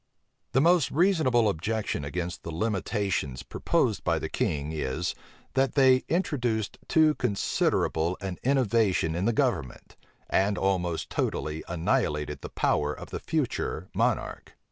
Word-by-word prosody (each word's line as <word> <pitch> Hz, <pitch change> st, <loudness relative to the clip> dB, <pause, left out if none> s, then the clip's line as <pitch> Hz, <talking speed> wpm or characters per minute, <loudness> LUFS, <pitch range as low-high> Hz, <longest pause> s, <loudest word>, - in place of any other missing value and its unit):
The 135 Hz, -, +4 dB
most 170 Hz, -2 st, +4 dB
reasonable 155 Hz, -, +3 dB
objection 105 Hz, -2 st, -1 dB
against 90 Hz, +4 st, -4 dB
the -, -, -7 dB
limitations 95 Hz, -, -1 dB
proposed -, -, 0 dB
by -, -, +1 dB
the -, -, -4 dB
king, 75 Hz, +1 st, -1 dB
is, 80 Hz, +2 st, -2 dB, 0.4 s
that 135 Hz, -1 st, +1 dB
they 130 Hz, -2 st, +6 dB
introduced 125 Hz, -, -1 dB
too 155 Hz, -1 st, +4 dB
considerable 90 Hz, -, 0 dB
an 95 Hz, -2 st, -5 dB
innovation 115 Hz, -10 st, +2 dB
in 90 Hz, +4 st, -1 dB
the 115 Hz, -, +3 dB
government, 105 Hz, -, -1 dB, 0.3 s
and 100 Hz, +1 st, +2 dB
almost 90 Hz, -4 st, -1 dB
totally 75 Hz, +1 st, -2 dB
annihilated 75 Hz, -3 st, -1 dB
the -, -, -7 dB
power 75 Hz, 0 st, +1 dB
of -, -, -10 dB
the -, -, -3 dB
future 90 Hz, +5 st, -2 dB
monarch. -, -, -1 dB
100 Hz, 130 wpm, -27 LUFS, 80-125 Hz, 0.4 s, they